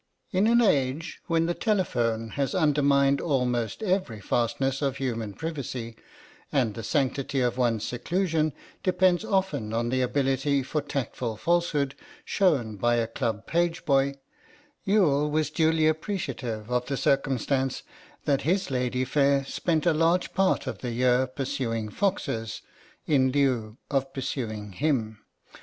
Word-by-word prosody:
In 195 +3 +3
an 235 +1 +5
age 150 - +1
when 165 -1 +2
the 175 - 0
telephone 120 - 0
has 140 - -2
undermined 140 -4 +3
almost 125 - 0
every 185 - 0
fastness 125 +6 0
of 135 -2 0
human 115 -6 -3
privacy, 130 -7 -5 0.6
and 125 -7 +1
the 115 - -6
sanctity 135 +3 0
of 120 -2 +1
one's 120 -4 +1
seclusion 160 +4 0 0.3
depends 185 0 +2
often 190 - -1
on 115 +1 0
the 130 +1 +1
ability 135 +1 +1
for 150 +3 -2
tactful 120 -5 -3
falsehood 165 -3 +1 0.3
shown 135 - +1
by 120 +4 +2
a 115 -1 +1
club 115 -1 -3
pageboy, 155 -5 +1 0.7
Youghal 150 -8 +3
was 155 +1 0
duly 160 -1 +2
appreciative 135 - -3
of 125 0 0
the 140 - -2
circumstance 135 0 0 0.4
that 140 -1 +2
his 180 +1 0
lady 125 0 0
fair 140 0 +2
spent 160 +3 -1
a 170 - +4
large 165 +3 +2
part 190 0 +2
of - - -5
the 125 -2 -4
year 125 +2 +3
pursuing 130 -4 -3
foxes, 115 - -2 0.4
in 130 -3 +3
lieu 125 -6 +1
of 135 -1 0
pursuing 110 -6 -4
him. 110 -2 -1
135 Hz, 135 wpm, -27 LUFS, 120-160 Hz, 0.7 s, an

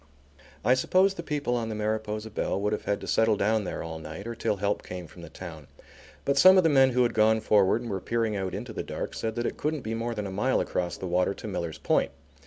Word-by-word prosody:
I 125 - +6
suppose 185 +9 +3
the 170 - -6
people 145 -6 -1
on 115 -2 -2
the 110 - -3
Mariposa 110 0 -2
Belle 100 - -1
would 105 +1 0
have 105 - -4
had 100 - 0
to - - -7
settle 110 -2 +3
down 110 +1 +1
there - - -4
all 80 -1 -6
night 80 +5 -8
or 115 - -4
till 110 -2 -1
help 100 +1 -1
came 90 -1 -7
from 85 +2 -14
the - - -10
town, 80 -5 -9 0.6
but 140 0 +2
some 185 +5 +8
of 185 - +6
the 165 - +4
men 135 -2 +6
who 125 0 +4
had 120 - +1
gone 110 0 +4
forward 105 +2 +3
and 115 - -5
were 95 -1 -2
peering 115 -2 -1
out 95 -2 -3
into 110 +3 -6
the - - -3
dark - - -5
said 110 -1 -3
that 120 0 -2
it - - -3
couldn't 150 -1 -1
be 110 -1 -4
more 115 +1 -2
than 105 -1 -3
a 95 - -5
mile 115 +8 +1
across 90 -1 -2
the - - -6
water 90 +2 +1
to - - -8
Miller's 85 -5 -4
Point. - - +1
110 Hz, 265 wpm, -27 LUFS, 95-120 Hz, 0.6 s, some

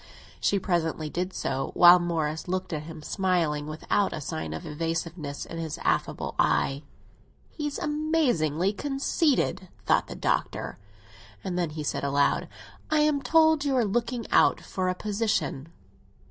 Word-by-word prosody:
She 200 - +2
presently 165 -4 -1
did 180 +2 -2
so, 135 -6 -2
while 175 0 +9
Morris 160 -2 -2
looked 185 0 -2
at 150 - -2
him, 160 -1 -9
smiling, 165 -6 0
without 160 +6 0
a - - -4
sign 80 - -4
of 80 - -6
evasiveness 165 -1 -3
in 165 - -7
his 160 -2 -4
affable - - 0
eye. 135 +1 +2 0.7
"He's 295 -2 -4
amazingly 250 - +1
conceited!" 270 - 0 0.2
thought - - +3
the - - -7
Doctor; - - -2 0.6
and 185 -2 -3
then 175 -2 0
he 155 0 -5
said 145 - -2
aloud: 140 0 +2 0.4
"I 310 -1 +3
am 300 -2 +2
told 315 +2 +4
you 280 -2 +1
are 240 - +3
looking 235 +2 -1
out - - +5
for 185 -1 -2
a 185 - -1
position." 200 -9 -1
180 Hz, 145 wpm, -27 LUFS, 155-240 Hz, 0.7 s, while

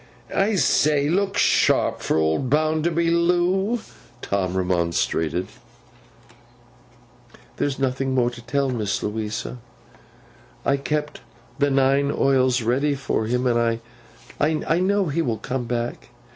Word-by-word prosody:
'I 205 +2 +2
say! 150 -5 +2
Look 195 +3 0
sharp - - +2
for - - 0
old 80 +11 +1
Bounderby, 160 +3 +1
Loo!' 180 +6 +1 0.4
Tom 95 -2 -1
remonstrated. 85 -1 0 2.1
'There's 140 -2 -1
no 135 -2 0
more 125 -2 +1
to 120 -1 -11
tell, 135 +2 -1
Miss 105 -5 -2
Louisa. 110 +3 -4 1.1
I 140 - +2
keep 150 +1 -3 0.4
the 145 0 +3
nine 135 +1 +2
oils 130 -3 +2
ready 140 +5 +1
for 135 -5 -2
him, 125 +2 0
and 115 -2 +1 0.6
I 155 +2 +1
know 200 +2 +2
he 165 +1 -1
will 115 -7 -1
come 125 +3 -4
back. 120 0 -4
135 Hz, 115 wpm, -23 LUFS, 115-155 Hz, 2.1 s, the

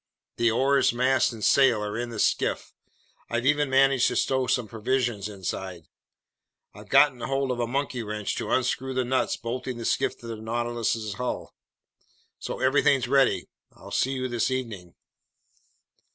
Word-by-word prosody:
The 115 0 +3
oars, 135 +4 +3
mast, 130 +2 +2
and 110 -2 -8
sail 125 -6 +4
are 105 0 -4
in 120 +1 -3
the 115 - -7
skiff. - - 0 0.6
I've 120 +1 -1
even 145 0 +2
managed 135 -1 +4
to - - -2
stow 130 -1 +1
some 125 -3 0
provisions 115 -2 -1
inside. 95 -3 -5 0.9
I've 105 0 -13
gotten 140 -3 +5
hold 135 +1 -1
of 125 - -3
a 120 - 0
monkey 135 0 -2
wrench 105 -1 -3
to - - -4
unscrew 130 +1 0
the 130 -1 0
nuts 130 +1 0
bolting 125 +2 -5
the 115 - -6
skiff - - 0
to - - -12
the 115 -1 -5
Nautilus's 115 -1 -2
hull. 125 +4 -4 0.9
So - - -5
everything's 135 -1 +3
ready. 135 0 +2 0.3
I'll - - -13
see 135 - +1
you 130 -1 -2
this 120 -1 0
evening." 110 -9 -5
120 Hz, 160 wpm, -26 LUFS, 115-130 Hz, 0.9 s, gotten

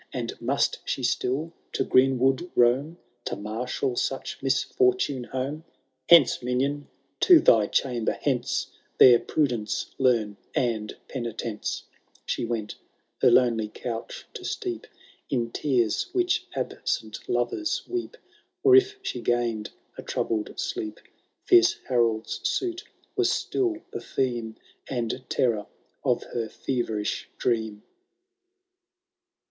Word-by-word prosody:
And 120 -3 -3
must 130 +4 +1
she 130 - -3
still 135 +7 0 0.2
to - - +1
greenwood 135 +5 +3
roam. 130 +7 +3 0.3
To - - -2
marshal 120 +5 -3
such 135 +2 -3
misfortune 140 - +1
home? 135 +5 -4 0.2
'* - - -34
Hence, 170 -6 +7
minion 135 +4 -1 0.2
— - - -45
^to 360 - +8
thy 110 -3 +6
chamber 120 -2 0
hence— 125 -4 -1 0.3
There 120 -2 +8
prudence 120 -9 -1
learn, 115 -6 +2 0.2
and 110 -4 -1
penitence/* 115 -4 -4 0.4
She - - -1
went 115 -3 -3 0.2
— - - -41
her - - +7
lonely 115 -4 +3
couch 115 0 -6
to 440 -5 -8
steep 375 +2 -4 0.4
In 120 -4 -1
tears 120 -7 +1
which 360 0 +1
absent - - -3
lovers 335 -4 0
weep; 365 +7 -4 0.5
Or 400 -2 +7
if 390 +1 +5
she 390 - -3
gained 120 -3 0 0.3
a - - -3
troubled 110 -2 -2
sleep. 340 -3 -3 0.5
Fierce 360 -1 +6
Harolds 115 -3 +1
suit 380 -1 -1 0.3
was 380 -1 +2
still 365 -4 0 0.2
the - - -5
theme 120 -3 -2 0.3
And 120 0 -2
terror 110 -5 +1 0.4
of - - +1
her 115 -2 -2
feverish 110 -5 -2
dream. 110 -3 -1
125 Hz, 120 wpm, -26 LUFS, 115-165 Hz, 0.5 s, ^to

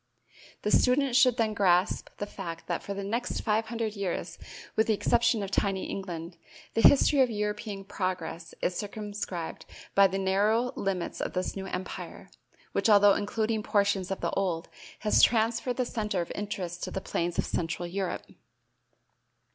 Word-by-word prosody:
The 210 - 0
student 255 +2 +3
should 255 -2 +5
then 220 -3 +1
grasp 185 -2 +2
the 205 - -3
fact 175 -5 -7
that - - -2
for 200 - -5
the 200 - -4
next 235 +5 -2
five 220 0 +1
hundred 225 -2 -3
years, 195 -3 -3 0.4
with 220 - +3
the 220 - +3
exception 235 0 +2
of 195 - -5
tiny 195 -2 0
England, 170 -3 -5 0.4
the 225 - +1
history 285 +2 +6
of 255 - +4
European 210 -2 -3
progress 185 -4 -4
is 180 - +1
circumscribed 205 -4 -5 0.3
by 200 0 +7
the 190 +1 -3
narrow 210 +6 +2
limits 190 -3 -2
of - - -3
this 185 0 -2
new 195 -1 -5
empire, 185 0 -6 0.4
which - - +1
although 205 -1 +7
including 215 +2 -1
portions 200 -3 +1
of 195 - -3
the - - 0
old, 180 -4 -1 0.3
has 210 - +4
transferred 230 +2 +3
the 255 - +1
center 210 -5 -2
of 170 - -3
interest 185 -4 -4
to - - -5
the - - -3
plains 175 -2 -2
of - - +1
central 170 +1 -2
Europe. 190 +1 -3
200 Hz, 165 wpm, -29 LUFS, 185-220 Hz, 0.4 s, by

